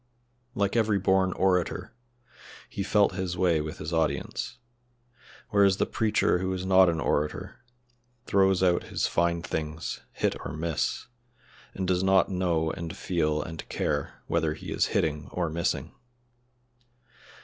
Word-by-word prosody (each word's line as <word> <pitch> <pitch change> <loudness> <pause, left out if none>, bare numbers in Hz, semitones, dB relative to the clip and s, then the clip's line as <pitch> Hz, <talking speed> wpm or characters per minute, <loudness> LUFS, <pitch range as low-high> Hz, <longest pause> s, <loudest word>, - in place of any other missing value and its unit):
Like 100 +1 0
every 110 -3 +3
born 95 -1 +2
orator, 90 -2 0 0.7
he - - -5
felt 100 +1 +3
his 95 -2 -3
way 85 -4 +3
with 75 +1 -6
his 80 +2 -5
audience, 100 +10 -1 0.9
whereas 100 -2 +4
the - - +2
preacher 105 -4 +1
who 95 +1 -1
is 95 0 -4
not 95 -1 +6
an 80 -1 -1
orator 75 -1 -1 0.7
throws 95 -1 +3
out 90 -1 +3
his - - -1
fine 85 0 +1
things, 80 -1 -4
hit - - 0
or - - -5
miss, 80 -1 -1 0.7
and 95 -1 -2
does 90 -1 +2
not 95 -2 +4
know 85 -4 +1
and 85 +1 -6
feel 75 -4 0
and 80 +1 -8
care 75 -1 -2
whether 80 -2 0
he - - -8
is - - +2
hitting 75 -1 -1
or 85 -3 -1
missing. 85 +1 -1
90 Hz, 140 wpm, -27 LUFS, 80-95 Hz, 0.9 s, not